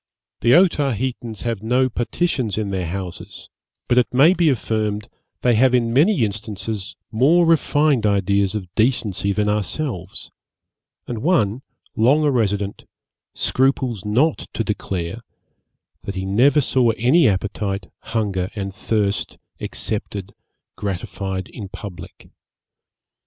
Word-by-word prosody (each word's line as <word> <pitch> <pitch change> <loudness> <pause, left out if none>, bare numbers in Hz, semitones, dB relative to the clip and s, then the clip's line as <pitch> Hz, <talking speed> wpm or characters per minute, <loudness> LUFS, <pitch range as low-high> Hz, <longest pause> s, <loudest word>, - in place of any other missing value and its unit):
'The 120 +1 +5
Otaheitans 130 - +1
have 115 -4 -2
no 125 +4 +2
partitions 120 - -1
in 105 -2 -2
their 95 -3 -2
houses; 90 0 -7 0.4
but, 125 - +4
it 125 - 0
may 140 +8 +6
be 170 -4 +3
affirmed, 110 -4 -1 0.4
they 125 - +4
have 125 +3 +4
in 115 -2 +1
many 155 - +4
instances 105 -1 -5 0.2
more 150 +10 +4
refined 150 -5 +3
ideas 100 -1 +1
of 95 -4 -5
decency 110 -4 +1
than 105 +1 0
ourselves; 105 - -3 0.7
and 115 -3 -5
one, 130 - +2 0.3
long 130 +7 +4
a 145 - +3
resident, 105 -5 -1 0.5
scruples 130 -5 +1
not 130 +10 +1
to 115 - -1
declare, 100 -1 -3 0.8
that 100 - -6
he 95 0 -3
never 130 +10 +4
saw 125 -2 +2
any 130 +7 +4
appetite, 100 -1 -2
hunger 100 -5 -2
and 100 -2 -4
thirst 100 -1 -1 0.2
excepted, 100 -3 -4 0.4
gratified 95 -1 -4
in 100 -4 -8
public. 100 -3 -10
110 Hz, 120 wpm, -21 LUFS, 100-130 Hz, 0.8 s, may